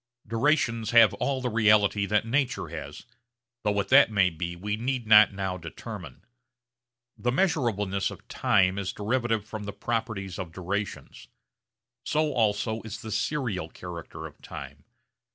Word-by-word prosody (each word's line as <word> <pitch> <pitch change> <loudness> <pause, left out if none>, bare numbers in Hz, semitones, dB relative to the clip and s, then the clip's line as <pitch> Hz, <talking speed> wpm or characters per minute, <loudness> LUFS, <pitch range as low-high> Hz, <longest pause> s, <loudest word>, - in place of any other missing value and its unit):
Durations 115 -2 +1
have 115 -2 +7
all 135 -2 -1
the 125 - -1
reality 105 -2 +3
that 105 +1 +2
nature 125 - 0
has, 75 -3 -8 0.6
though 105 - +1
what 100 -1 -1
that 140 -1 +7
may 100 -4 +3
be 85 +2 -4
we 105 +4 -3
need 125 +2 -2
not 110 -1 +7
now 95 -2 -3
determine. 80 -2 -9 0.9
The 120 - -1
measurableness 120 - +1
of - - -12
time 95 -1 +2
is 95 -2 -3
derivative 115 0 -1
from 110 -1 -7
the 100 - -5
properties 110 -6 -3
of 90 -3 -5
durations. 95 +3 -5 0.8
So 150 +1 0
also 110 -1 0
is 110 -1 -8
the 110 - -6
serial 115 - -2
character 85 -2 -8
of - - -12
time. 70 +1 -9
105 Hz, 145 wpm, -27 LUFS, 95-120 Hz, 0.9 s, have